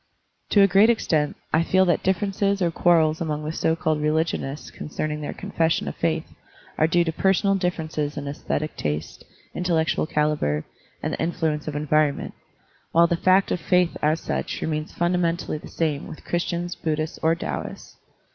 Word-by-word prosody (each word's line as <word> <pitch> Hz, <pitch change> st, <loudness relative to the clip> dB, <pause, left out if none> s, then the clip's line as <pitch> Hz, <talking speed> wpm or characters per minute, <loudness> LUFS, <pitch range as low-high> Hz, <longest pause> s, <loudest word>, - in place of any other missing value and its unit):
To 205 Hz, -, +5 dB
a 195 Hz, -, +7 dB
great 200 Hz, +4 st, +5 dB
extent, 155 Hz, -10 st, +1 dB, 0.2 s
I 160 Hz, -, +5 dB
feel 190 Hz, +3 st, +3 dB
that 175 Hz, -3 st, +2 dB
differences 195 Hz, +1 st, 0 dB
or 175 Hz, -3 st, +1 dB
quarrels 160 Hz, -2 st, +3 dB
among 155 Hz, -2 st, -2 dB
the 155 Hz, -, -2 dB
so 160 Hz, 0 st, +1 dB
called 155 Hz, -2 st, 0 dB
religionists 150 Hz, -2 st, -1 dB
concerning 150 Hz, 0 st, -4 dB
their 145 Hz, -, -4 dB
con 200 Hz, -, -8 dB
fession 165 Hz, -2 st, +1 dB
of -, -, -4 dB
faith 160 Hz, -1 st, 0 dB, 0.5 s
are 155 Hz, -, +5 dB
due 175 Hz, +1 st, +3 dB
to 165 Hz, -, -1 dB
personal 195 Hz, +3 st, +2 dB
differences 160 Hz, -5 st, -2 dB
in 145 Hz, 0 st, -4 dB
esthetic 150 Hz, +1 st, -3 dB
taste, 75 Hz, +1 st, -4 dB, 0.3 s
intellectual 165 Hz, -3 st, 0 dB
calibre, 150 Hz, -, 0 dB, 0.4 s
and -, -, -1 dB
the -, -, -2 dB
influ 165 Hz, -1 st, 0 dB
ence 150 Hz, +1 st, -6 dB
of 150 Hz, -, -3 dB
environment, 150 Hz, -1 st, +1 dB, 0.6 s
while 170 Hz, +1 st, +6 dB
the 170 Hz, -, +1 dB
fact 185 Hz, +3 st, +3 dB
of -, -, 0 dB
faith 180 Hz, +1 st, +2 dB
as 155 Hz, +2 st, +2 dB
such -, -, -3 dB
remains 155 Hz, 0 st, -2 dB
fundamentally 175 Hz, -2 st, 0 dB
the -, -, -11 dB
same 155 Hz, -3 st, -2 dB
with -, -, -10 dB
Christians, 175 Hz, 0 st, -2 dB
Buddhists, 155 Hz, 0 st, -3 dB
or 160 Hz, +1 st, +3 dB
Taoists. 170 Hz, -, -6 dB
160 Hz, 175 wpm, -24 LUFS, 150-175 Hz, 0.6 s, a